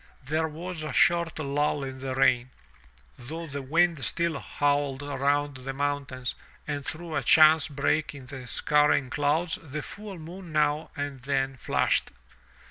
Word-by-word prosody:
There 155 +4 0
was 165 +2 -6
a 155 -2 -4
short 170 +2 +3
lull 145 -1 0
in 130 -1 -6
the 130 0 -3
rain, 125 -1 +3 0.7
though 160 +7 -6
the 140 -2 -5
wind 165 +1 +2
still 170 -4 0
howled 145 -1 0
around 145 0 0
the 135 +1 -5
mountain, 140 -2 -2 0.4
and 145 -1 -3
through 160 +2 -4
a - - +1
chance 155 -1 +6
break 145 +1 0
in 135 -2 -10
the 130 -1 -8
scurrying 150 -3 +2
clouds 155 +4 +1
the 150 -1 -6
full 205 -2 -8
moon 170 +2 -9
now 150 0 +1
and 145 -1 -4
then 135 0 0
flashed. 130 - +1
145 Hz, 150 wpm, -27 LUFS, 135-160 Hz, 0.7 s, chance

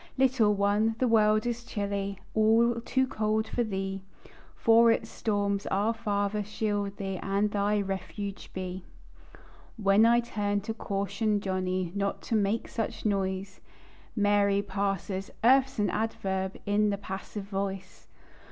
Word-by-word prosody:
Little 250 -6 +3
one, 205 +3 +2
the 255 - +1
world 215 -1 +4
is 240 0 -2
chilly, 200 -3 -3 0.2
All 230 +2 +3
too 260 +2 +1
cold 220 -2 -1
for 240 - -1
thee; 195 -2 -3 0.5
From 230 +1 +5
its 225 -1 +1
storms 200 -2 -1
"Our 205 +4 +1
Father" 210 -2 -1
shield 205 -1 -2
thee, 195 -1 -3
And 200 +1 0
thy 205 +1 +1
refuge 195 +1 -5
be. 185 0 -5 0.9
While 205 +1 +5
I 235 +1 +5
turn 205 -3 -1
to 220 +3 -4
caution 200 0 -1
Johnny 185 -2 -2
Not 200 0 -2
to 225 - -1
make 210 +2 +1
such 225 -1 -4
noise; 190 -2 -1 0.5
Mary 205 -1 +3
parses: 195 -1 -2
"Earth's 265 +2 +4
an 205 -3 +1
adverb, 190 -3 -2
In 205 +1 +2
the 200 - -1
passive 195 +1 -6
voice." 195 -1 -5
205 Hz, 135 wpm, -28 LUFS, 195-220 Hz, 0.9 s, From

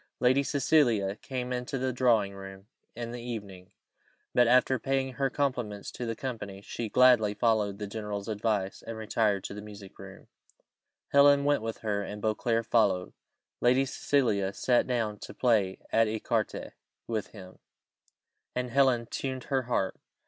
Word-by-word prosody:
Lady 130 +3 +4
Cecilia 125 -9 +2
came 125 -1 -4
into 125 +2 -3
the 130 0 -1
drawing 115 -6 +2
room 95 0 -10 0.3
in 115 0 -5
the 120 0 -6
evening; 100 -6 -7 0.6
but, 120 -1 +5
after 125 +1 +4
paying 135 +1 -1
her 135 +1 0
compliments 120 -8 -2
to 120 - -5
the 115 - -2
company, 110 -7 -6
she 110 +2 -5
gladly 120 -4 +5
followed 105 -3 +1
the 105 - -4
general's 105 -1 -5
advice, 105 -3 -1
and 115 0 -7
retired 105 -2 0
to - - -6
the 105 - -7
music 100 -2 -12
room: - - -11 0.8
Helen 140 0 +6
went 145 -2 +2
with 115 0 -4
her, 105 -2 -1
and 105 +1 -6
Beauclerc 115 +2 0
followed. 100 -6 +2 0.5
Lady 125 +3 +3
Cecilia 110 -8 0
sat 125 +3 +2
down 110 -5 -1
to - - -9
play 105 -7 +2
at 115 0 +4
ecarté 110 0 -2 0.3
with 110 -3 -3
him, 95 -4 -13 1.0
and 125 -1 -2
Helen 130 -3 +3
tuned 130 +2 -4
her 135 - +3
harp. 115 -6 -1
115 Hz, 155 wpm, -29 LUFS, 105-125 Hz, 1.0 s, Helen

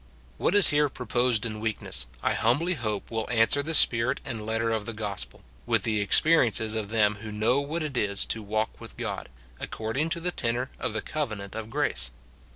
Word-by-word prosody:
What 195 - +2
is 205 -5 +7
here 150 0 +3
proposed 120 -2 0
in 110 -2 -4
weakness, 105 - -2 0.2
I - - +2
humbly 145 +11 +2
hope 110 - -3
will 110 -1 -2
answer 115 +4 +4
the 160 +3 -2
spirit 115 -2 +3
and 115 -4 -5
letter 115 +1 0
of 110 -2 -1
the 115 - -3
gospel, 100 - -4 0.2
with - - +2
the 110 -2 +1
experiences 115 -2 +3
of 110 -2 -2
them 105 -2 +2
who 110 -1 -6
know 110 +5 +2
what 155 +4 -3
it 150 -3 -4
is 100 -4 +2
to 110 - -2
walk 110 +1 -2
with - - -10
God, - - -4 0.3
according 115 +9 -2
to 170 +1 -2
the 180 +1 -1
tenor 120 -2 -1
of - - -2
the 110 - -2
covenant 110 -10 -3
of 110 -1 -5
grace. - - 0
115 Hz, 195 wpm, -27 LUFS, 110-135 Hz, 0.3 s, is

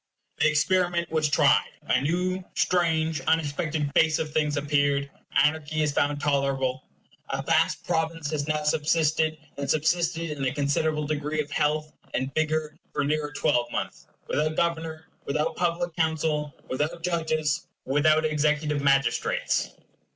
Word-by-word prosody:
The 155 - +5
experiment 170 +2 +1
was 155 -1 +1
tried. 150 -1 +4
A - - +1
new, 180 +5 -1
strange, 160 -4 +1
unexpected 155 -1 0
face 155 0 +4
of 155 -1 -4
things 150 -1 +1
appeared. 145 -1 +1 0.3
Anarchy 155 0 0
is 150 - +1
found 145 0 0
tolerable. 135 -3 0 0.5
A - - -2
vast - - +2
province 160 -2 -1
has 145 -2 -2
now 150 -1 0
subsisted, 155 +1 +1 0.2
and 140 -1 -4
subsisted 165 +1 +1
in 145 -2 -4
a 130 -1 0
considerable 150 +2 0
degree 150 +1 -2
of 150 0 -2
health 155 +1 0 0.2
and 130 +1 -2
vigor 155 -1 0 0.2
for - - -1
near 150 +1 0
a 145 - -13
twelvemonth, 120 0 -1 0.2
without 155 +1 0
Governor, 160 -1 -1 0.2
without 150 +3 -1
public 175 -1 -1
Council, 160 -2 0 0.2
without 155 +6 -2
judges, 155 -3 0 0.2
without 155 +3 +3
executive 150 -1 +1
magistrates. 135 -1 +1
155 Hz, 135 wpm, -26 LUFS, 145-160 Hz, 0.5 s, The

